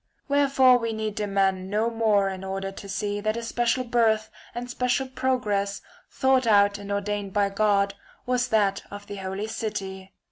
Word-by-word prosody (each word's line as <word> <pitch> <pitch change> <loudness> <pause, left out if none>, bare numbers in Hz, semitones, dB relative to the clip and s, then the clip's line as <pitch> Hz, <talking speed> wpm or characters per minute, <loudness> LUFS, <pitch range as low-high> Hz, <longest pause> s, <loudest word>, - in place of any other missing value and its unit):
Wherefore 275 -3 +4
we 230 - -2
®ce - - -1
for - - -5
need 215 -1 -2
demand 195 -3 0
no 215 +3 0
more 215 -3 +2
in 190 -1 -5
order 195 0 -4
to 200 +1 -10
see 205 +1 -2
that 215 +2 -1
a - - -3
°'"® - - -9
special 240 +2 0
birth 225 -3 +1 0.2
and 245 +1 -4
special 250 +2 0
progress, 210 -7 -1 0.3
thought 265 -2 +2
out 205 -1 +4
and 200 0 -7
ordained 200 -1 -2
by 205 -1 +2
God, 200 -1 +2 0.3
was 250 0 +1
that 205 -4 +2
of 205 0 -9
the 200 0 -7
holy 190 +2 -4
city. 195 -4 -5
210 Hz, 185 wpm, -25 LUFS, 200-235 Hz, 0.3 s, Wherefore